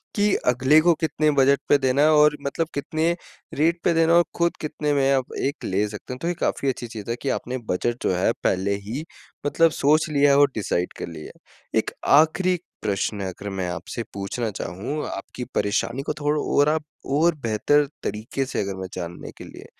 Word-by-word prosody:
कि 205 -1 +3
अगले 130 +5 +5
को 175 +1 +5
कितने 155 -1 +1
बजट 135 +1 +5
पे 145 - +6
देना 135 0 +1
है 155 - +6
और 150 -1 +5
मतलब 150 +4 -2
कितने 160 +4 0 0.4
रेट 165 +3 +2
पे 170 - +3
देना 165 0 +3
है - - +7
और 175 - +6
खुद 170 0 +1
कितने 150 -1 -1
में 135 -1 +3
आप 130 -2 -1
एक 140 +2 -2
ले 100 +3 0
सकते 105 +4 -7
हैं। 125 - -8
तो 165 - -2
ये 175 - +1
काफ़ी 140 - 0
अच्छी 120 -2 -3
चीज़ 110 -1 -8
है 115 - 0
कि 140 - -1
आपने 130 0 -2
बजट 120 +6 -1
जो - - +2
है 90 - +2
पहले 95 +2 +1
ही 130 +8 -4 0.4
मतलब 165 +3 +3
सोच 155 +2 +2
लिया 145 -1 +4
है 140 - +5
और 145 -1 +6
डिसाइड 90 -4 -1
कर - - -5
लिया 80 -2 -9
है। - - -5
एक - - -3 0.3
आख़िरी 180 +4 +3 0.3
प्रश्न 100 +1 -1
अगर 95 +2 -6
मैं 95 -2 -3
आपसे 90 +6 -5
पूछना 100 +4 -3
चाहूँ, 100 - -4
आपकी 125 +5 -6
परेशानी 110 +5 0
को - - -2
थोड़ा 150 0 +1
और 145 +1 +3
आप 155 0 0 0.3
और 160 +4 +3
बेहतर 130 +7 +2 0.2
तरीके 110 +6 -3
से 130 - -2
अगर 100 -1 -3
मैं 95 - -4
जानने 85 -1 -6
के - - -9
लिए। - - -12
140 Hz, 210 wpm, -24 LUFS, 105-155 Hz, 0.4 s, है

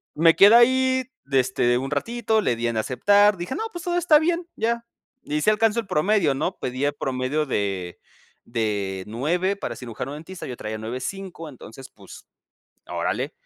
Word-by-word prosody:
Me 165 +1 +5
quedé 205 +3 +8
ahí, 260 +2 +4 0.3
este, 125 -2 +2
un 135 +2 -4
ratito, 220 +8 0
le 125 - +1
di 120 +1 -2
en 115 -1 -2
aceptar, 205 - +3
dije 175 +8 -5
no, 440 - -3
pues, 345 -3 -7
todo 350 -1 -1
está 345 -3 +5
bien, 340 +2 -1
ya, 235 +1 -1 0.4
y 150 +1 -2
si 210 - +3
alcanzo 225 +1 +2
el 225 - -5
promedio, 185 -2 +2
¿no? 180 +7 -2
Pedía 130 +3 -2
el 145 - -8
promedio 135 +3 -1
de 95 -8 -3 0.5
de 100 -5 -2
9 175 - -1
para - - -5
cirujano 125 +2 -6
dentista, 165 +5 -8
yo 125 - -5
traía 110 -1 -5
9,5. 160 - -6
Entonces, 130 -1 -12
pues, - - -14 0.6
órale, - - -2
155 Hz, 170 wpm, -24 LUFS, -, 0.6 s, quedé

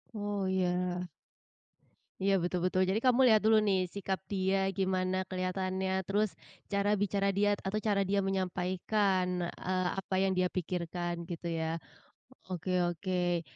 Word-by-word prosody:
Oh, 205 -2 -2
iya. 185 -1 +1 1.5
Iya, 195 +1 +3
betul-betul. 180 +1 +1
Jadi 200 +3 +2
kamu 255 -1 +4
lihat 220 -2 +6
dulu 220 0 +6
nih 190 -2 +3
sikap 195 -1 -2
dia 195 0 +1
gimana 185 -1 +1
kelihatannya, 185 0 -2 0.2
terus 210 +2 +2 0.4
cara 200 0 +1
bicara 200 0 +1
dia 205 +1 +3 0.2
atau 210 +2 0
cara 200 -2 +3
dia 200 0 +3
menyampaikan, 185 0 0
eee, 185 +1 -2
apa 190 0 -3
yang 195 - +2
dia 185 0 +3
pikirkan 175 -1 -3
gitu 170 0 -5
ya. 165 0 -2 0.7
Oke 185 0 -3
oke. 175 0 -1
185 Hz, 135 wpm, -31 LUFS, 180-200 Hz, 1.5 s, lihat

